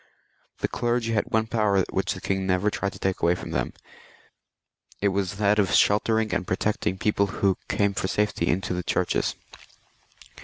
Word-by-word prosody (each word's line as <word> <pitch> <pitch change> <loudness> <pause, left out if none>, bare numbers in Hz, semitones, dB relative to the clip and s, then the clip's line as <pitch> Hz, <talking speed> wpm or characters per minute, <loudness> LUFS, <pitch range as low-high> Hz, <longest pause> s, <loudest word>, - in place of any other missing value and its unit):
The - - +1
clergy 120 -1 -1
had 105 - +1
one 110 0 +2
power 105 -4 +2
which - - -1
the - - -9
king 95 -1 -1
never 95 +3 +2
tried 100 -1 -2
to - - -10
take 95 -1 -1
from 85 +1 0
them, - - -1 1.3
it 100 - +2
was 100 0 -1
that 105 +1 +2
of 95 -4 +2
sheltering 110 +1 +3
and 90 - -1
protecting 95 0 -1
people 100 0 +1
who 95 -1 0
came 100 -1 +1
for 95 - -2
safety 105 -4 0
into 90 +1 0
the 90 - -2
churches. - - 0
100 Hz, 165 wpm, -25 LUFS, 95-105 Hz, 1.3 s, sheltering